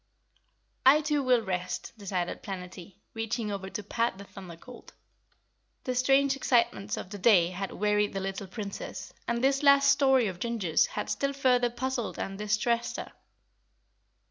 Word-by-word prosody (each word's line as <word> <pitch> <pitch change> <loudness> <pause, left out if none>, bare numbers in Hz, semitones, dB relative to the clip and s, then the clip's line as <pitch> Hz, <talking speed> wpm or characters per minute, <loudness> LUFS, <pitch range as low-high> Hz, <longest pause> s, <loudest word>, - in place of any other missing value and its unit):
"I 280 +4 +7
too 300 -1 0
will 250 -3 +3
ret," 185 -1 -3
decided 190 -4 -3
Planetty, 185 -1 -8 0.2
reaching 225 -1 -3
over 195 -1 -5
to 210 - -5
pat 230 +1 -1
the 200 - -9
Thunder 190 -3 -11
Colt. 245 +7 -14 0.9
The 255 - -2
strange 270 +2 +3
excitements 235 -6 +1
of 185 - -7
the 205 - -6
day 180 -4 +5
had 195 +2 -4
wearied 210 0 +1
the 195 - -2
little 195 0 -4
Princess, 200 +1 -7
and 235 +1 -1
this 275 0 +3
last 280 -1 +6
story 265 -3 +4
of 185 -3 -4
Ginger's 230 - +1
had - - -4
still 275 0 -1
further 250 -3 +2
puzzled 240 -1 -3
and 195 - -4
distressed 215 +3 -1
her. - - -7
225 Hz, 155 wpm, -28 LUFS, 195-255 Hz, 0.9 s, I